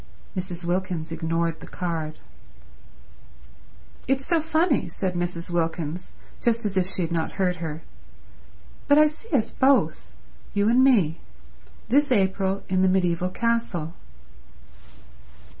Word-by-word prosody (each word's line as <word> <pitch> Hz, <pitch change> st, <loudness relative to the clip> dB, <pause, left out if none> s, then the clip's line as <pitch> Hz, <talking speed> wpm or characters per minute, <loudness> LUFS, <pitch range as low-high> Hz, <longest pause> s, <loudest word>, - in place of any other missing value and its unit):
Mrs. 180 Hz, -2 st, -5 dB
Wilkins 175 Hz, -2 st, -2 dB
ignored 165 Hz, 0 st, -1 dB
the -, -, -11 dB
card. 160 Hz, -3 st, -4 dB, 1.9 s
"It's 270 Hz, +1 st, +1 dB
so 335 Hz, -2 st, +2 dB
funny," 320 Hz, -1 st, +1 dB
said 185 Hz, -2 st, -2 dB
Mrs. 175 Hz, 0 st, -3 dB
Wilkins, 165 Hz, 0 st, -2 dB, 0.3 s
just 230 Hz, -1 st, +1 dB
as 200 Hz, -2 st, -1 dB
if 185 Hz, -1 st, +1 dB
she 185 Hz, -, 0 dB
had 165 Hz, -, -3 dB
not 165 Hz, -1 st, -1 dB
heard 180 Hz, -2 st, 0 dB
her, 160 Hz, -1 st, -5 dB, 1.0 s
"But 285 Hz, 0 st, +6 dB
I 305 Hz, -, +8 dB
see 310 Hz, +9 st, -5 dB
us 235 Hz, -7 st, +1 dB
both—you 260 Hz, -5 st, 0 dB
and 245 Hz, +3 st, +5 dB
me—this 150 Hz, -, 0 dB
April 195 Hz, -2 st, +1 dB
in 185 Hz, 0 st, +1 dB
the 190 Hz, -, +4 dB
mediaeval 180 Hz, -1 st, +1 dB
castle." 215 Hz, -7 st, -1 dB
185 Hz, 120 wpm, -25 LUFS, 165-230 Hz, 1.9 s, I